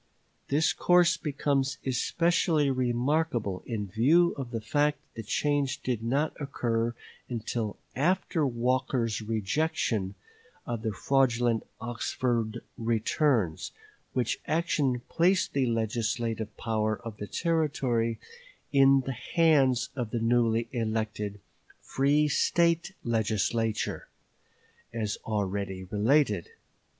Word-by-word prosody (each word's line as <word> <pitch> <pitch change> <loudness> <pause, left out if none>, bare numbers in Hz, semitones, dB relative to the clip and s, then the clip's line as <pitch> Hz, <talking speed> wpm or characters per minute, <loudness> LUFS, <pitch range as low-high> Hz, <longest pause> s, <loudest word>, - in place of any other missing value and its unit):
This 150 +3 +2
course 175 -1 +4
becomes 140 -3 -1
especially 155 +2 +2
remarkable 125 - 0
in 110 -4 -2
view 140 - +3
of 135 -4 -5
the 115 -2 -3
fact 145 +7 +1 0.2
that 115 - -6
the 105 - -15
change 145 0 0
did 125 -4 -1
not 140 +7 0
occur 120 -4 -1 0.3
until 115 -2 -3 0.2
after 165 +2 +1
Walker's 125 -3 0
rejection 110 -2 -1 0.5
of 120 -2 -3
the 110 -1 -1
fraudulent 120 0 +1
Oxford 120 0 -2 0.2
returns, 115 - 0 0.4
which 125 -3 0
action 150 -6 +1
placed 185 +3 +2
the 135 -2 +1
legislative 115 -1 -2
power 110 -1 -1
of 110 -2 -6
the 105 - -6
Territory 135 - 0 0.6
in 135 -1 +6
the 135 - -4
hands 130 -2 +2
of 120 -5 -3
the 120 - -2
newly 115 0 +2
elected 110 -3 -2 0.4
free 145 +3 +2
State 170 +4 +2
Legislature, 110 0 -1 0.8
as 110 -2 -2
already 100 -3 -2
related. 105 - +1
120 Hz, 105 wpm, -28 LUFS, 110-145 Hz, 0.8 s, in